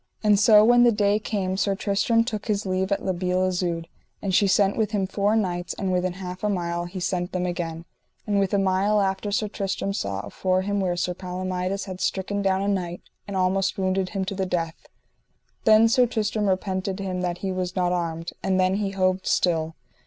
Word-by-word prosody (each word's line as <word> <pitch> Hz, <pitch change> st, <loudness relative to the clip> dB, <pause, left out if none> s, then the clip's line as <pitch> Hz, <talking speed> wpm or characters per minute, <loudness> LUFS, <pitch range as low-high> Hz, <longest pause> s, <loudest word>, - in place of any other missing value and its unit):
And 210 Hz, -2 st, +4 dB
so 215 Hz, 0 st, +7 dB
when 240 Hz, +1 st, +6 dB
the 240 Hz, -, +6 dB
day 205 Hz, -1 st, +2 dB
came 190 Hz, -3 st, -2 dB
Sir 195 Hz, 0 st, +1 dB
Tristram 210 Hz, +3 st, +2 dB
took 215 Hz, -3 st, -5 dB
his 210 Hz, -1 st, 0 dB
leave 190 Hz, +1 st, -1 dB
at 200 Hz, -, -1 dB
La 190 Hz, -, +1 dB
Beale 180 Hz, +1 st, 0 dB
Isoud, 175 Hz, -2 st, -2 dB, 0.3 s
and 195 Hz, -2 st, -3 dB
she 200 Hz, +2 st, +4 dB
sent 195 Hz, +1 st, +3 dB
with 220 Hz, -3 st, 0 dB
him 200 Hz, -2 st, +1 dB
four 200 Hz, +2 st, +1 dB
knights, 180 Hz, -5 st, -1 dB
and 195 Hz, -2 st, -2 dB
within 180 Hz, 0 st, 0 dB
half 185 Hz, 0 st, -7 dB
a 210 Hz, -, +1 dB
mile 175 Hz, -3 st, -2 dB
he 180 Hz, +2 st, -6 dB
sent 180 Hz, 0 st, -2 dB
them 180 Hz, -1 st, -1 dB
again: 170 Hz, -2 st, -4 dB, 0.4 s
and 205 Hz, -1 st, +1 dB
within 195 Hz, 0 st, +1 dB
a -, -, +1 dB
mile 195 Hz, +3 st, +2 dB
after 195 Hz, +1 st, -1 dB
Sir 210 Hz, +1 st, 0 dB
Tristram 195 Hz, -1 st, -3 dB
saw 100 Hz, -, -3 dB
afore 185 Hz, 0 st, -1 dB
him 205 Hz, +1 st, -1 dB
where 180 Hz, -2 st, 0 dB
Sir 180 Hz, +1 st, -1 dB
Palomides 185 Hz, +1 st, -3 dB
had 185 Hz, -2 st, -7 dB
stricken 200 Hz, +1 st, -1 dB
down 195 Hz, 0 st, +1 dB
a -, -, -1 dB
knight, 180 Hz, -3 st, -2 dB, 0.2 s
and 200 Hz, -1 st, -3 dB
almost 190 Hz, +1 st, +1 dB
wounded 190 Hz, -1 st, 0 dB
him 195 Hz, 0 st, -2 dB
to 195 Hz, -, -3 dB
the 190 Hz, -1 st, -2 dB
death. 165 Hz, -2 st, -3 dB, 0.8 s
Then 220 Hz, +1 st, +7 dB
Sir 250 Hz, +1 st, +4 dB
Tristram 215 Hz, -2 st, -1 dB
repented 190 Hz, 0 st, -1 dB
him 185 Hz, -2 st, -3 dB
that 175 Hz, -1 st, -2 dB
he 190 Hz, -, -1 dB
was 185 Hz, 0 st, -3 dB
not 180 Hz, -1 st, +1 dB
armed, 165 Hz, -2 st, -2 dB
and 190 Hz, -1 st, +1 dB
then 185 Hz, +1 st, +2 dB
he 200 Hz, -2 st, -2 dB
hoved 185 Hz, -1 st, 0 dB
still. 165 Hz, -2 st, +1 dB
190 Hz, 210 wpm, -24 LUFS, 180-200 Hz, 0.8 s, so